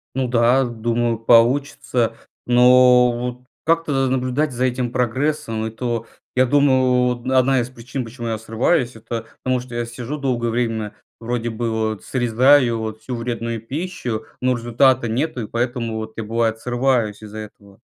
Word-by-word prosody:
Ну 130 -1 0
да, 120 +2 +3
думаю, 120 -1 -1
получится, 120 0 +2 0.3
но 125 0 +6
вот 125 +1 -5 0.2
как-то 155 -5 +1
наблюдать 130 +3 0
за 125 +1 -1
этим 125 -1 -1
прогрессом- 125 -2 -1
это, 115 +1 -3 0.3
я 130 0 +4
думал, 130 -2 +3
вот 130 +2 -5
одна 130 0 +3
из 120 - -5
причин, 125 +1 -6
почему 120 +1 -7
я 110 -1 -1
срываюсь- 120 +4 0
это 115 0 -6 0.2
потому 130 -1 +1
что 125 0 -10
я 120 0 -2
сижу 120 +5 -6
долгое 120 -4 -1
время, 115 -3 -2 0.3
вроде 120 0 -2
бы 115 +1 -3
вот 110 -2 -2
срезаю 125 0 +3
вот 110 -1 -5
всю 125 +3 -5
вредную 115 -1 -3
пищу, 125 - -4
но 130 0 +1
результата 120 +1 +2
нету, 130 +3 -2
и 110 - -5
поэтому 120 -1 -2
вот 110 0 -5
я, 115 - -3
бывает, 115 +1 0
срываюсь 120 -4 0
из-за 105 0 -9
этого. 100 -2 -12
120 Hz, 155 wpm, -21 LUFS, 115-130 Hz, 0.3 s, но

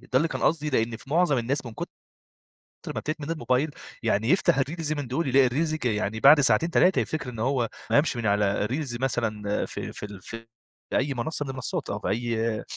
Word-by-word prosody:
ده 130 - -18
اللي 165 +5 +3
كان - - -4
قصدي. 155 -2 +1
لإن 115 -2 0
في 135 - -15
مُعظم 160 -5 +3
الناس 130 +3 -1
من 115 - -7
كُتر - - -5 1.1
ما - - -1
بتدمن 155 0 -4
الموبايل، 135 0 0 0.3
يعني 110 +5 +1
يفتح 170 -4 +3
الreels 155 +2 -1
من 145 - -3
دول 140 +5 -1
يلاقي 130 0 +5
الreels 155 +5 0
ج 155 - -6
يعني 110 -1 0
بعد 145 +4 +8
ساعتين، 135 +6 +3
3 185 +2 +4
يفتكر 150 -5 -2
إن 115 -3 -8
هو 125 -1 +1 0.2
ما - - +2
قامش 145 -3 +3
من 115 - -3
على 105 0 +2
الreels 125 -1 -3
مثلًا، 110 -5 -1
ف - - -7
فـي - - -6
ال 100 -3 -10
في 115 +3 -9 0.5
أي 140 +2 +1
منصة 145 +4 -2
من - - -7
المنصات 135 +4 -4
أو 100 - -2
في - - -4
أي 115 0 -1
130 Hz, 210 wpm, -26 LUFS, 115-150 Hz, 1.1 s, بعد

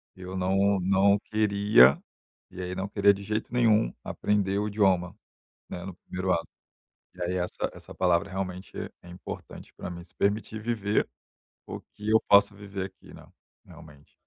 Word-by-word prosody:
Eu 95 0 -8
não 95 +2 +2
não 100 +2 +3
queria, 100 - +5 0.5
e 95 0 -8
aí 90 0 -4
não 95 +2 -3
queria 100 0 +4
de 100 - -8
jeito 105 +2 -3
nenhum 110 - +3
aprender 100 -1 0
o 105 - -1
idioma, 95 -4 +1 0.5
né, 90 - -6
no 95 - -6
primeiro 90 +1 -3
ato. 85 - 0 0.7
E 90 - -7
aí 90 +1 -1
essa 90 0 -2
essa - - -12
palavra 90 +1 +2
realmente 95 0 -5 0.3
é 90 - -14
importante 90 +1 -9
pra - - -7
mim, 85 -1 -7
se - - -16
permitir 105 +2 -1
viver 110 -2 0 0.6
o - - -6
que 105 +1 -7
eu 110 - +5
posso 100 +1 +6
viver 100 -1 -5
aqui, - - -16
né, - - -13 0.4
realmente. 75 -2 -16
95 Hz, 165 wpm, -27 LUFS, 90-105 Hz, 0.7 s, posso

